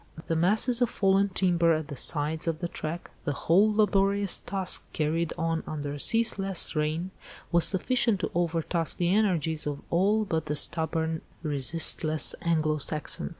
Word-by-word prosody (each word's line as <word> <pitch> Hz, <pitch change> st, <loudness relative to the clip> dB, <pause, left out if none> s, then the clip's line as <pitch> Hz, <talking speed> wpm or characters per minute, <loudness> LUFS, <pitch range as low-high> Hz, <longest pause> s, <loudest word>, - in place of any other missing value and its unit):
The 165 Hz, -, -2 dB
masses 215 Hz, +8 st, +2 dB
of 245 Hz, -, +2 dB
fallen 195 Hz, 0 st, +1 dB
timber 175 Hz, -3 st, +2 dB
at 155 Hz, -1 st, -5 dB
the 145 Hz, -, -6 dB
sides 155 Hz, +4 st, +1 dB
of 165 Hz, -1 st, -1 dB
the 175 Hz, +1 st, -4 dB
track, 170 Hz, +1 st, -6 dB
the 145 Hz, -, -2 dB
whole 190 Hz, +9 st, +2 dB
laborious 200 Hz, -1 st, +1 dB
task 190 Hz, -1 st, -1 dB
carried 160 Hz, +1 st, -1 dB
on 165 Hz, 0 st, -1 dB
under 145 Hz, -1 st, -5 dB
ceaseless 195 Hz, -4 st, +2 dB
rain, 155 Hz, +4 st, -2 dB, 0.4 s
was 170 Hz, -1 st, +5 dB
sufficient 225 Hz, +1 st, +1 dB
to -, -, -3 dB
over 170 Hz, -1 st, -1 dB
task 165 Hz, -1 st, -2 dB
the 175 Hz, +1 st, +1 dB
energies 165 Hz, -8 st, 0 dB
of 145 Hz, -1 st, -4 dB
all 205 Hz, +5 st, +2 dB
but 160 Hz, -5 st, -3 dB
the 150 Hz, -, -2 dB
stubborn, 160 Hz, +1 st, 0 dB, 0.2 s
resistless 155 Hz, +1 st, +2 dB
Anglo 155 Hz, -2 st, 0 dB
Saxon. 145 Hz, -, -2 dB
170 Hz, 155 wpm, -27 LUFS, 155-195 Hz, 0.4 s, was